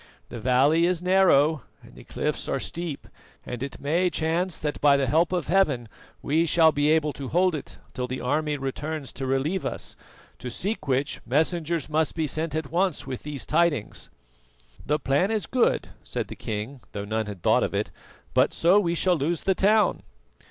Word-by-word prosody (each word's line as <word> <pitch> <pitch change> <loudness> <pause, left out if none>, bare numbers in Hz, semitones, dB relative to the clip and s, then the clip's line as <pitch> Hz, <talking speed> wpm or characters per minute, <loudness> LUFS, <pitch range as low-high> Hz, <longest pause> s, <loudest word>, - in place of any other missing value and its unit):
The 120 - -7
valley 135 +8 +3
is 180 -1 -1
narrow 160 -6 +4 0.2
and - - -16
the - - -13
cliffs - - -3
are - - -1
steep, 170 -4 -5 0.4
and 120 - -6
it 140 0 -5
may 165 +6 +1
chance 170 +2 0
that 150 -1 -4
by 145 -1 +6
the 140 - +1
help 160 +7 +2
of 180 -3 -1
Heaven 145 -9 +2 0.4
we 160 +4 +2
shall 160 0 +5
be 145 0 +1
able 155 -2 +2
to 140 - -6
hold 180 +5 +2
it 150 - -6 0.2
till 125 0 -3
the 130 +1 -4
army 150 +3 0
returns 145 +2 -4
to 135 - -4
relieve 140 +8 0
us, - - -3 0.4
to 125 - -5
seek 175 - -3
which 135 +2 0
messengers 160 +3 0
must 155 0 0
be 160 -2 0
sent 155 +1 -2
at 155 -3 -3
once 180 -1 0
with 130 -2 -5
these 145 -2 -5
tidings." 155 -8 0 0.7
"The 150 - +1
plan 145 +6 +1
is 220 -3 -1
good," 255 -2 +1
said - - -4
the - - -7
king, 110 +5 -5
though 100 -1 -4
none 110 +1 -2
had 100 -4 -8
thought - - +4
of - - -1
it; - - -1 0.4
"but - - +3
so 180 +5 +4
we 170 -4 0
shall 180 +1 +2
lose 160 +2 -1
the 190 - +3
town." 210 +3 +3
155 Hz, 190 wpm, -25 LUFS, 135-170 Hz, 0.7 s, by